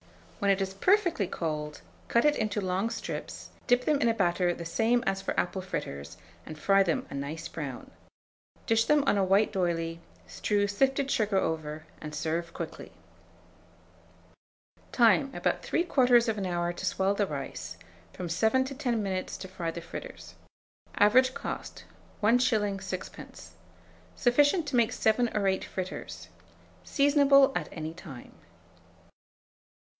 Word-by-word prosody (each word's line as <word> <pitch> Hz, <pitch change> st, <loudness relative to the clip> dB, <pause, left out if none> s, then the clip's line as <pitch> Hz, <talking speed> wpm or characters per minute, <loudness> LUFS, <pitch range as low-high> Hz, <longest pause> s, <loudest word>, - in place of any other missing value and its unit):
When 200 Hz, -, +1 dB
it 195 Hz, 0 st, +3 dB
is 195 Hz, 0 st, -2 dB
perfectly 345 Hz, -, +2 dB
cold, 150 Hz, -3 st, -4 dB, 0.3 s
cut 235 Hz, -, +2 dB
it 295 Hz, 0 st, +4 dB
into 215 Hz, -3 st, -1 dB
long 190 Hz, +3 st, -1 dB
strips, 230 Hz, -, -6 dB, 0.2 s
dip 245 Hz, 0 st, +3 dB
them 295 Hz, -2 st, +2 dB
in 235 Hz, -, +3 dB
a -, -, +3 dB
batter 175 Hz, -2 st, +2 dB
the 170 Hz, -1 st, -6 dB
same 230 Hz, +8 st, +1 dB
as 195 Hz, -2 st, 0 dB
for -, -, -2 dB
apple 190 Hz, +1 st, -1 dB
fritters, 85 Hz, -, -6 dB, 0.3 s
and 155 Hz, -, -8 dB
fry 195 Hz, +5 st, +4 dB
them 175 Hz, -4 st, 0 dB
a -, -, -6 dB
nice 140 Hz, +3 st, -5 dB
brown. 140 Hz, -6 st, -7 dB, 0.7 s
Dish 225 Hz, 0 st, +3 dB
them 300 Hz, +1 st, +3 dB
on 205 Hz, -, +3 dB
a -, -, +3 dB
white 195 Hz, +3 st, +3 dB
d'oyley, 165 Hz, -3 st, -1 dB, 0.3 s
strew 205 Hz, -1 st, 0 dB
sifted 270 Hz, +6 st, +1 dB
sugar 210 Hz, -3 st, +1 dB
over, 155 Hz, -3 st, -2 dB, 0.2 s
and 150 Hz, 0 st, -7 dB
serve 165 Hz, +2 st, -2 dB
quickly. -, -, -7 dB, 2.0 s
Time. 245 Hz, +3 st, +4 dB
About -, -, 0 dB
3/4 240 Hz, -, +2 dB
hour 175 Hz, -1 st, -1 dB
to -, -, -6 dB
swell 195 Hz, +1 st, +1 dB
the 200 Hz, 0 st, 0 dB
rice; 135 Hz, -, -6 dB, 0.3 s
from 180 Hz, -, -6 dB
7 220 Hz, +10 st, +2 dB
to 270 Hz, -, -6 dB
10 245 Hz, -6 st, -1 dB
minutes 190 Hz, -2 st, -3 dB
to 190 Hz, -, -8 dB
fry 180 Hz, -3 st, -4 dB
the 170 Hz, +1 st, -6 dB
fritters. 175 Hz, -, -9 dB, 0.6 s
Average 255 Hz, +5 st, +5 dB
cost, -, -, -6 dB, 0.4 s
1s. 245 Hz, +4 st, +4 dB, 0.3 s
6d. 185 Hz, -1 st, -8 dB, 0.7 s
Sufficient 290 Hz, +6 st, +3 dB
to 275 Hz, -, -2 dB
make 235 Hz, -1 st, +3 dB
7 230 Hz, +2 st, +2 dB
or 200 Hz, -, +1 dB
8 190 Hz, 0 st, +1 dB
fritters. 185 Hz, 0 st, -6 dB, 0.5 s
Seasonable 280 Hz, -1 st, +5 dB
at -, -, -2 dB
any 160 Hz, -1 st, -5 dB
time. 155 Hz, -8 st, -11 dB
195 Hz, 145 wpm, -29 LUFS, 170-245 Hz, 2.0 s, Average